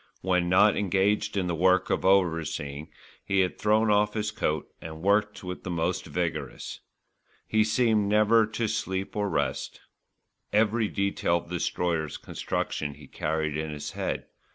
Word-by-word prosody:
When 90 -1 +1
not 100 +3 +5
engaged 100 +1 +1
in 95 - +1
the 90 - -1
work 95 +3 +3
of - - 0
overseeing, 80 -6 +1 0.3
he 95 -1 +2
had 90 - -1
thrown 110 +1 +3
off 105 +1 +2
his 105 -1 -1
coat 80 -6 -1
and 80 0 -8
worked 105 +1 +2
with 90 0 -6
the - - -5
most 85 +1 -1
vigorous. 80 -3 -3 0.7
He 110 0 +3
seemed 110 -2 +2
never 110 +1 +4
to 110 +1 -2
sleep 95 -3 -3
or 105 -1 0
rest. 70 -6 -2 0.7
Every 110 +1 +2
detail 100 -4 0
of 85 - -9
the 90 - -2
Destroyer's 85 -3 -1
construction 75 -1 -3
he 75 0 -13
carried 80 +2 -2
in 80 0 -2
his 75 -1 -5
head. - - -3
95 Hz, 155 wpm, -27 LUFS, 80-105 Hz, 0.7 s, not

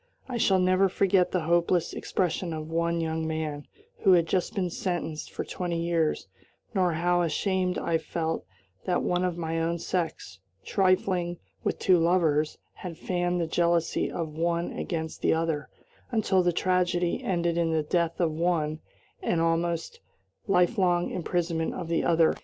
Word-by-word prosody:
I 250 -2 -3
shall 195 -4 +3
never 185 +1 +3
forget 190 -1 +3
the 180 - 0
hopeless 170 +1 +1
expression 180 -1 -1
of 155 0 -6
one 170 +1 0
young 160 0 -1
man, 155 -2 -3 0.3
who 190 - +5
had 170 -2 +5
just 180 +5 -1
been 180 -3 -1
sentenced 165 -4 -3
for - - -4
twenty 175 -2 -3
years, 165 -2 0 0.5
nor 185 -4 +2
how 175 +2 +2
ashamed 180 +2 0
I 165 -1 0
felt 160 +1 -3 0.4
that 180 - +1
one 180 0 +1
of 180 -2 -1
my 165 -1 -2
own 165 +1 0
sex, 160 - -3 0.3
trifling 185 -2 +1 0.3
with - - -1
two 185 -2 +4
lovers, 165 -3 +2 0.2
had 170 -3 -8
fanned 175 0 -1
the 170 - +1
jealousy 170 0 +1
of 165 -2 -3
one 170 +1 0
against 160 -2 -4
the - - +3
other, 160 -2 -1 0.4
until 210 -5 +2
the 175 0 +2
tragedy 180 0 +1
ended 170 -2 0
in 170 -1 +1
the 160 -1 +1
death 170 +1 0
of 170 -3 +2
one 155 -1 0 0.4
and 170 - 0
the - - +2
almost 170 - -1 0.5
lifelong 180 -2 +2
imprisonment 170 -2 -1
of 170 -3 -5
the 165 - +1
other. 165 -1 +4
170 Hz, 160 wpm, -27 LUFS, 165-180 Hz, 0.5 s, who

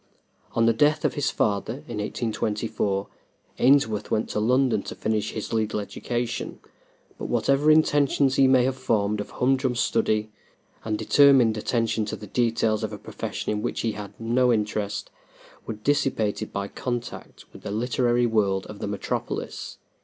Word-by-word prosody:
On 115 - +3
the 115 - +4
death 145 +6 +2
of - - +2
his 145 -2 0
father, 110 +5 -1
in 115 -3 -5
1824, 105 -2 -2 0.5
Ainsworth 125 -5 +3
went 110 - 0
to - - -1
London 125 -1 +2
to - - -7
finish 110 -1 -1
his 110 +1 -5
legal 110 -1 0
education, 120 +3 -4 0.6
but - - -4
whatever 140 +2 +2
intentions 145 -3 +4
he 135 0 +5
may 130 -1 +5
have 130 +1 0
formed 105 -4 0
of - - -7
humdrum 130 0 +1
study 110 -2 +1 0.5
and 110 -1 -1
determined 135 -6 +5
attention 115 0 0
to 105 - -4
the 105 - -10
details 115 -1 +1
of 110 - -2
a 105 - -6
profession 105 - -5
in 105 0 -1
which - - -2
he 115 - 0
had 105 -1 -9
no 120 +2 +2
interest, 105 -2 -2 0.6
were 110 - -3
dissipated 120 -3 0
by 100 0 -3
contact 120 +2 -6
with - - -12
the - - -6
literary 120 +2 +1
world 100 -4 +1
of 105 - -10
the - - -3
metropolis. 100 -1 -4
115 Hz, 160 wpm, -25 LUFS, 105-130 Hz, 0.6 s, he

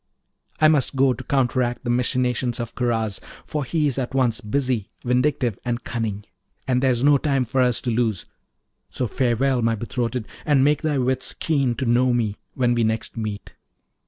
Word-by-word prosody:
I 155 - +6
must 150 -3 +2
go 135 -1 +4
to - - -8
counteract 125 -3 0
the 120 - -1
machinations 125 0 0
of 115 -1 -4
Karaz, 115 -4 -1 0.3
for 150 -2 -3
he's 145 -1 0
at 130 0 -3
once 125 -4 +1
busy, 125 -1 -1 0.2
vindictive, 125 -2 +1
and 120 0 -2
cunning, 110 -4 -3 0.4
and 125 -1 +2
there's 130 -2 +2
no 145 -1 +5
time 135 -3 +1
for 130 +3 0
us 125 -2 +2
to 120 - -1
lose; 110 -6 0 0.6
so 130 - -2
farewell, 125 +2 +1
my 115 0 +2
betrothed, 120 +1 -3 0.2
and 145 -3 +3
make 145 +1 +3
thy 155 -3 0
wits 130 0 0
keen 140 -6 0
to 130 - -2
know 125 +1 +3
me 110 -4 0 0.2
when 125 -2 +2
we 120 -1 +1
next 110 0 -1
meet.' 110 -3 -5
125 Hz, 175 wpm, -23 LUFS, 115-135 Hz, 0.6 s, I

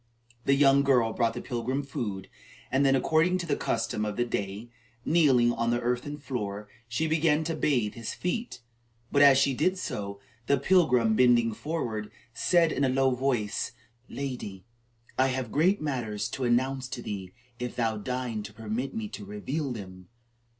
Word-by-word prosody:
The 140 - +4
young 140 0 +5
girl 125 -5 +3
brought 115 -1 +1
the - - -5
pilgrim 125 +3 -2
food, 105 -8 -4 0.4
and 135 +2 +3
then, 135 -1 +4
according 160 +7 +2
to 175 - -4
the 165 - 0
custom 115 -2 -1
of 105 -1 -2
the 120 - +2
day, 105 +1 -4 0.3
kneeling 135 -8 +4
on 115 0 -1
the 120 0 +1
earthen 125 +4 -2
floor, 105 -7 -4 0.2
she 120 +7 -1
began 160 -1 +2
to 165 +1 -2
bathe 125 -9 +1
his 115 -2 -5
feet. 180 - -3 0.5
But 145 - +3
as 140 -2 +8
she 135 0 +3
did 185 +8 +1
so, 100 - -4 0.3
the 140 - +4
pilgrim, 125 -8 +3
bending 120 -2 +4
forward, 115 -7 -3 0.2
said 170 +1 +3
in 140 - 0
a 135 - +3
low 135 0 +3
voice: 125 -3 -1 0.4
"Lady, 120 -9 -5 0.5
I 130 - +5
have 130 -3 -2
great 185 +7 +3
matters 120 -8 -2
to 130 - -3
announce 130 +2 +1
to 120 -2 -6
thee, 95 -3 -5 0.3
if 125 0 -4
thou 115 -2 0
deign 125 0 -3
to 105 0 -9
permit 110 +5 -4
me 110 -1 -3
to 105 - -8
reveal 130 +9 -3
them." 95 -5 -8
125 Hz, 170 wpm, -28 LUFS, 110-140 Hz, 0.5 s, as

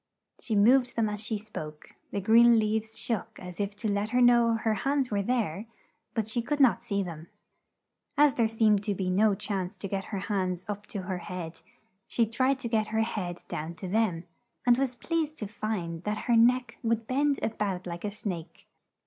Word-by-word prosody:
She 220 - -2
moved 245 +5 +4
them 225 -2 +2
as 210 0 -3
she 220 0 -1
spoke; 155 -8 -8 0.2
the 200 - -2
green 230 +3 +6
leaves 220 0 0
shook 230 -5 -3
as 180 -1 -9
if 200 0 -2
to 215 - -4
let 205 +1 0
her 250 +2 +2
know 240 -2 +5
her 225 -1 0
hands 270 +4 0
were 200 -1 +1
there, 215 -3 -1 0.5
but 220 -3 0
she 235 +2 -1
could 290 +5 -2
not 265 -4 +4
see 200 -1 -1
them. 165 -2 -8 0.9
As 290 -1 +6
there 230 -2 +2
seemed 220 -2 +3
to 205 -2 0
be 185 -1 -1
no 205 +2 +4
chance 195 -1 -3
to 195 - -5
get 195 0 -3
her 205 - -4
hands 185 -3 -2
up 205 0 -5
to 195 - -5
her 180 0 -3
head, 175 -2 -7 0.5
she 235 - +2
tried 255 +5 +1
to 240 - -3
get 220 -2 +1
her 220 0 0
head 180 -6 -4
down 160 +3 -5
to 175 +3 -7
them 190 -4 +1 0.4
and 245 -1 +6
was 265 -2 0
pleased 315 +2 -2
to 210 - -4
find 195 -6 -4
that 210 0 -1
her 240 - +3
neck 245 +1 +3
would 230 -1 0
bend 280 +3 +1
a - - +2
bout 195 -4 -3
like 170 -1 -6
a 210 - -1
snake. 190 -5 -6
215 Hz, 205 wpm, -28 LUFS, 190-235 Hz, 0.9 s, green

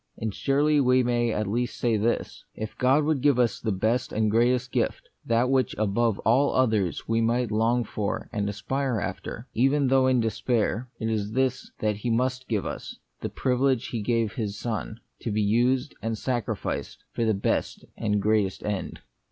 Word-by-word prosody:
And 110 -2 -3
surely 145 +4 +2
we 125 -1 +4
may 120 -1 +1
at 105 0 -1
least 120 +5 -2
say 120 -2 +1
this: 110 +3 -1
If 110 0 -6
God 135 +4 +3
would 150 -3 +1
give 140 -2 +4
us 120 -2 +2
the 110 - -1
best 115 +6 0
and 110 -1 +1
greatest 125 +3 +2
gift, - - -1 0.2
that 115 +2 +2
which 130 0 +1
above 110 +1 +1
all 130 +6 +3
others 110 -8 +1
we 115 0 +1
might 115 0 +1
long 115 +3 +2
for 110 +1 -3
and 105 -3 -1
aspire 120 +4 -1
after, 100 +6 -5
even 135 +3 +2
though 130 0 +4
in 130 -1 +3
despair, 115 +1 0
it 110 - -2
is 105 -1 -2
this 130 0 0
that 105 -1 0
He 120 +4 -3
must 125 +2 0
give 105 -4 0
us, - - -6 0.2
the - - -4
privilege 130 0 +1
He 115 - -3
gave 115 0 +1
His 105 -5 -3
Son, 110 -1 -4 0.2
to - - -4
be 105 0 +1
used 125 +6 +2
and 115 0 -2
sacrificed 120 -1 -3
for 115 - -2
the 110 -2 +2
best 100 - -1
and 105 -2 0
greatest 105 -2 +1
end. 100 -3 -3
115 Hz, 185 wpm, -26 LUFS, 110-125 Hz, 0.2 s, we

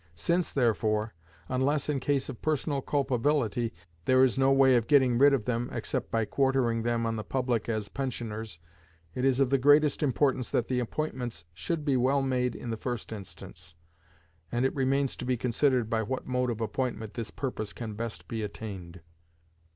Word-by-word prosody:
Since, 170 - 0
therefore, 110 -3 +1 0.3
unless 135 +3 0
in 145 -2 0
case 135 0 0
of 130 -5 -8
personal 150 -2 0
culpability, 130 -4 0 0.3
there 130 0 +5
is 130 - +3
no 135 0 +3
way 135 -1 +6
of 115 -2 +1
getting 130 -5 +4
rid 140 +1 +7
of 130 -6 +1
them 120 0 -1
except 115 - -3
by 115 -1 +1
quartering 130 -1 +1
them 115 0 0
on 115 0 -1
the 110 - -3
public 125 -3 -1
as 110 -2 -1
pensioners, 115 -6 -4 0.6
it 125 - -3
is 135 -1 +3
of 135 -2 +3
the 135 - +4
greatest 145 +2 +5
importance 130 -2 +1
that 120 - 0
the 125 -1 +1
appointments 125 - -3
should 155 - -3
be 140 -3 +2
well 135 +3 +2
made 125 -2 0
in 120 - -5
the 115 - -2
first 120 -1 -4
instance; 85 -5 -9 0.8
and 120 +2 +1
it 135 - +1
remains 135 0 +1
to - - -6
be 125 0 0
considered 125 0 +1
by 115 -1 0
what 130 +4 -3
mode 125 -1 0
of 115 -1 -3
appointment 115 -2 -2
this 115 -2 -4
purpose 115 -6 -4
can 110 -3 -6
best 115 +1 -6
be 115 -2 -3
attained. 95 -5 -7
125 Hz, 180 wpm, -29 LUFS, 115-135 Hz, 0.8 s, rid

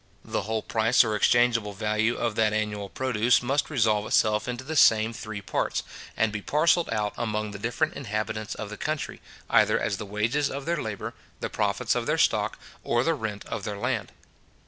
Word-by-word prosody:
The - - -2
whole 110 -1 -1
price 115 +3 +3
or 110 -2 -1
exchangeable 115 -1 +3
value 110 +3 0
of 115 -2 -1
that 110 -1 +2
annual 105 -2 -2
produce 125 -1 +2
must 140 +4 0
resolve 110 -7 +2
itself 105 +1 +2
into 125 +1 -4
the 155 +4 -5
same 110 -4 +5
three 110 -2 -6
parts, - - -1 0.3
and 110 0 +2
be 105 0 -4
parcelled 165 - +2
out 105 -2 -1
among 110 -2 -2
the 100 - -7
different 120 +8 -1
inhabitants 110 -4 -3
of 105 -1 -6
the 105 - -7
country, 155 -3 -3 0.3
either - - +4
as 100 - -1
the 105 - -6
wages 115 +8 0
of 140 0 -5
their 170 -2 0
labour, 110 -2 -5 0.3
the - - -4
profits - - 0
of - - -2
their - - +1
stock, - - +2 0.3
or 120 - +1
the 165 - +2
rent 110 -7 -5
of 110 -3 -5
their 105 0 -4
land. - - -2
110 Hz, 190 wpm, -26 LUFS, 105-125 Hz, 0.3 s, same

